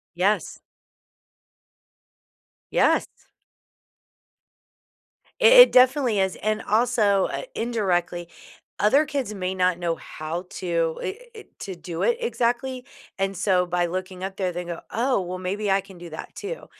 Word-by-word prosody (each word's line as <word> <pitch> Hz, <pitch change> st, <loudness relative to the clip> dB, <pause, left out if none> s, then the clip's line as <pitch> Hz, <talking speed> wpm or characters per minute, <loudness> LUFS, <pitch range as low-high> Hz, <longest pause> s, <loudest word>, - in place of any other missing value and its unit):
Yes. 195 Hz, +4 st, 0 dB, 2.1 s
Yes. -, -, +3 dB, 2.3 s
I -, -, +4 dB
it -, -, +9 dB
definitely 255 Hz, -3 st, +4 dB
is, 190 Hz, -1 st, +1 dB
and, 215 Hz, +1 st, -1 dB
also, 215 Hz, -3 st, +2 dB
uh, -, -, -3 dB
indirectly, 175 Hz, -7 st, -1 dB, 0.5 s
other 270 Hz, +9 st, +4 dB
kids 275 Hz, -7 st, -3 dB
may 185 Hz, -2 st, -3 dB
not 180 Hz, -1 st, +2 dB
know 170 Hz, -1 st, -1 dB
how 165 Hz, +4 st, -6 dB
to 170 Hz, -3 st, -2 dB
eh 380 Hz, -, -2 dB, 0.2 s
eh, 440 Hz, -, -10 dB, 0.2 s
to 190 Hz, -2 st, -6 dB
do 170 Hz, -1 st, -6 dB
it 480 Hz, -, +2 dB
exactly, 255 Hz, -, -1 dB, 0.3 s
and 195 Hz, 0 st, -1 dB
so 185 Hz, -3 st, +2 dB
by 175 Hz, 0 st, 0 dB
looking 185 Hz, +1 st, -5 dB
up 190 Hz, 0 st, -4 dB
there, 185 Hz, -2 st, -1 dB
they 175 Hz, +1 st, -4 dB
go, 170 Hz, -1 st, -6 dB
"Oh, 250 Hz, -1 st, +1 dB
well, 180 Hz, 0 st, -5 dB
maybe 200 Hz, +3 st, -3 dB
I 195 Hz, -, +4 dB
can 195 Hz, -1 st, -15 dB
do 175 Hz, -, -9 dB
that, 160 Hz, -, -9 dB
too." 475 Hz, +5 st, -6 dB
195 Hz, 140 wpm, -24 LUFS, 180-240 Hz, 2.3 s, it